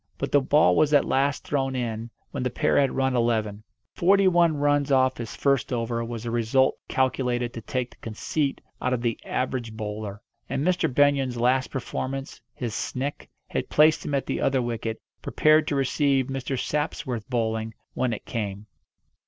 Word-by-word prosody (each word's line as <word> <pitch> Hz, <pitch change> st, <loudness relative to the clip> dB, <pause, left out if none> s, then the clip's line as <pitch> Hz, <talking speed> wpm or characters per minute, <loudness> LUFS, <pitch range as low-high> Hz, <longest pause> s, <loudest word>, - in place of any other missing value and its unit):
But -, -, -3 dB
the 145 Hz, -, +5 dB
ball 150 Hz, +3 st, +4 dB
was 150 Hz, -1 st, +3 dB
at 145 Hz, -, +4 dB
last 140 Hz, +1 st, +1 dB
thrown 135 Hz, -2 st, -1 dB
in 115 Hz, -2 st, -3 dB, 0.2 s
when -, -, -4 dB
the 125 Hz, -, 0 dB
pair 125 Hz, -, +2 dB
had 135 Hz, -2 st, +2 dB
run 130 Hz, -1 st, +1 dB
eleven. 110 Hz, -3 st, 0 dB, 0.3 s
Forty 195 Hz, +2 st, +4 dB
one 170 Hz, -4 st, +4 dB
runs 145 Hz, 0 st, +2 dB
off 130 Hz, -1 st, +4 dB
his 115 Hz, -3 st, -6 dB
first 140 Hz, -2 st, +1 dB
over 115 Hz, -1 st, -1 dB
was 115 Hz, 0 st, -6 dB
a 115 Hz, -, -2 dB
result 120 Hz, +3 st, +2 dB
calculated 125 Hz, -2 st, 0 dB
to 115 Hz, -, -6 dB
take 125 Hz, +3 st, -3 dB
the -, -, -18 dB
conceit 135 Hz, +6 st, -2 dB, 0.2 s
out 125 Hz, -, 0 dB
of 120 Hz, -1 st, -2 dB
the 115 Hz, -2 st, -1 dB
average 125 Hz, -3 st, -2 dB
bowler. 105 Hz, -1 st, -5 dB, 0.3 s
And 135 Hz, +2 st, -1 dB
Mr. 180 Hz, -5 st, +1 dB
Benyon's 135 Hz, -2 st, +2 dB
last 130 Hz, +2 st, +2 dB
performance, 135 Hz, +1 st, -4 dB
his 120 Hz, -4 st, -4 dB
"snick," 130 Hz, +5 st, -4 dB, 0.2 s
had -, -, -3 dB
placed 155 Hz, +1 st, +4 dB
him 145 Hz, -, -2 dB
at 135 Hz, -, 0 dB
the -, -, -2 dB
other 135 Hz, -1 st, +2 dB
wicket, 115 Hz, -1 st, -3 dB, 0.2 s
prepared 155 Hz, 0 st, +3 dB
to 145 Hz, -, 0 dB
receive 135 Hz, 0 st, +2 dB
Mr. 135 Hz, 0 st, -3 dB
Sapsworth's 140 Hz, -6 st, -2 dB
bowling 110 Hz, -3 st, -1 dB, 0.2 s
when 130 Hz, -2 st, 0 dB
it 110 Hz, -, -5 dB
came. 105 Hz, -3 st, -4 dB
130 Hz, 175 wpm, -25 LUFS, 115-140 Hz, 0.3 s, the